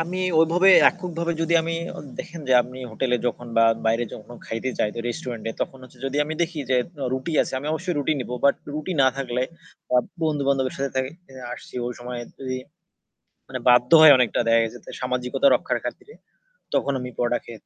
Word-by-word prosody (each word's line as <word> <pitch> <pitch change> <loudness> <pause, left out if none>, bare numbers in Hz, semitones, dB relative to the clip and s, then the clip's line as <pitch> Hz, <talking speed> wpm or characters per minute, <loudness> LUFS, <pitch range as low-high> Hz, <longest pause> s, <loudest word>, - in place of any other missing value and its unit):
আমি 170 +3 -3 0.2
ওভাবে 170 +4 +4 0.2
এককভাবে 170 -2 -3
যদি 165 +1 0
আমি 165 +1 -3 0.2
অ - - -9 0.2
দেখেন 170 -1 -7
যে - - +3
আমি 125 +1 -10
হোটেলে 125 +3 0
যখন 120 0 -3
বা 115 - +6 0.2
বাইরে 115 +2 +2
যখন 115 +3 -11
খাইতে 115 +3 -3
যাই 105 - +1
তো - - -7
রেস্টুরেন্ট 120 -4 -5
এ - - -6
তখন 135 - -6
হচ্ছে 130 - -15
যদি 135 +1 -3
আমি 155 +2 -4
দেখি 170 -1 -3
যে 130 - +4 0.3
উ - - -1
রুটি 130 +5 -4
আছে - - -7
আমি 140 - -7
অবশ্যই 175 +3 -2
রুটি 145 +2 +1
নিবো। 125 0 -4
বাট 140 - +6 0.2
রুটি 155 +5 -3
না - - +5
থাকলে 125 -2 -2 0.5
আ - - +6 0.3
বন্ধু 150 -3 0
বান্ধবের 135 -2 +1
সাথে 140 0 -1
তা - - +1 0.5
আসছি - - -11
ওই 125 - -3
সময় 120 0 -6 0.2
তে - - -12 1.1
মানে 130 - -4
বাধ্য 125 0 +5
হয় 155 -2 +10
অনেকটা 125 -3 +2
দেখা 115 0 +5
গেছে 115 +2 -6
তে - - -10
সামাজিকতা 125 - 0
রক্ষার - - 0
খাতিরে। 435 - -7 0.6
তখন 140 - +1
আমি 125 0 -5
পরোটা 120 0 +1
খে - - -10
130 Hz, 200 wpm, -24 LUFS, 125-160 Hz, 1.1 s, হয়